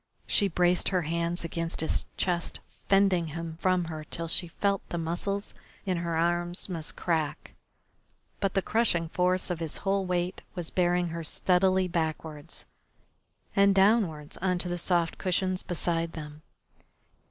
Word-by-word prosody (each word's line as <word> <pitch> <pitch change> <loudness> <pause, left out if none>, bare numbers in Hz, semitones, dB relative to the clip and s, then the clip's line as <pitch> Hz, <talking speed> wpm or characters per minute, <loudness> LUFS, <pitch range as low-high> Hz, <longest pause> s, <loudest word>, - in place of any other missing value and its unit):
She 200 - +3
braced 180 0 +2
her 180 -3 +1
hands 170 +2 -1
against 165 0 -3
his 160 - 0
chest, 175 -2 -1 0.3
fending 195 -4 +4
him 165 +1 -6
from 185 -1 +3
her 160 -1 -6
till 165 +2 -4
she 175 +2 0
felt 200 +3 0
the 170 - -3
muscles 175 +5 -2 0.3
in 185 -2 0
her 170 -1 -1
arms 175 +1 +1
must 165 -5 -2
crack, 160 -4 -1 0.9
but 195 -2 -1
the 195 - +2
crushing 175 -8 +1
force 180 +2 +1
of 175 - -2
his 160 -2 -1
whole 195 0 +2
weight 180 0 -1
was 175 -3 -3
bearing 175 -1 +2
her 165 0 -4
steadily 185 +3 +3
backwards, 160 -2 -3 0.9
and 200 0 +5
downwards 190 -7 +2
on 180 0 +1
to 175 - 0
the 175 0 -1
soft 170 -1 +1
cushions 185 0 0
beside 165 -1 -1
them. 150 -1 -8
175 Hz, 150 wpm, -28 LUFS, 165-185 Hz, 0.9 s, and